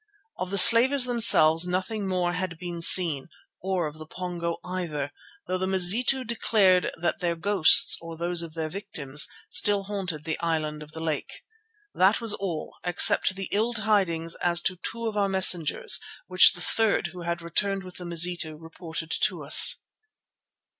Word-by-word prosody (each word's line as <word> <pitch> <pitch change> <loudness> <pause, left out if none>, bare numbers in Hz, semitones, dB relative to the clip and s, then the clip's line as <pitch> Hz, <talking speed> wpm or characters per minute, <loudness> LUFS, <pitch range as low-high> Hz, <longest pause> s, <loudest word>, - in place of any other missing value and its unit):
Of 185 - -5
the 200 - -4
slavers 250 +6 +6
themselves 180 -9 +5
nothing 190 +3 -5
more 180 -2 -3
had 180 -2 -6
been 175 -1 -8
seen, 165 -5 +5 0.3
or 185 -2 -3
of 150 +1 -9
the 155 - -12
Pongo 175 -1 -6
either, 165 -6 -6 0.3
though 185 0 -5
the 185 - -3
Mazitu 210 +8 +1
declared 210 -6 0
that 170 +1 -3
their 170 -2 -3
ghosts, 180 -1 +4
or 165 -1 -11
those 170 +1 -2
of 165 -1 -10
their 160 -1 -5
victims, 155 -7 -2 0.2
still 205 -1 +1
haunted 190 -6 -7
the 160 +1 -6
island 155 -2 -4
in 150 - -13
the 160 - -10
lake. 155 -2 -6 0.5
That 190 +4 +1
was 230 -3 +1
all, 175 -7 -7
except 180 +1 +2
the 195 -1 -7
ill 225 +4 -2
tidings 190 -7 -2
as 175 -1 +1
to 185 - -2
two 230 +6 -8
of 220 - -6
our 200 -1 -1
messengers 185 -5 +3 0.3
which 185 -1 +4
the 175 - -6
third, 220 +3 -1
who 180 - -11
had 170 0 -6
returned 195 +3 -3
with 185 -1 -12
the 180 - -10
Mazitu, 170 -2 +1
reported 165 0 -10
to - - -5
us. - - +6
180 Hz, 165 wpm, -24 LUFS, 165-195 Hz, 0.5 s, slavers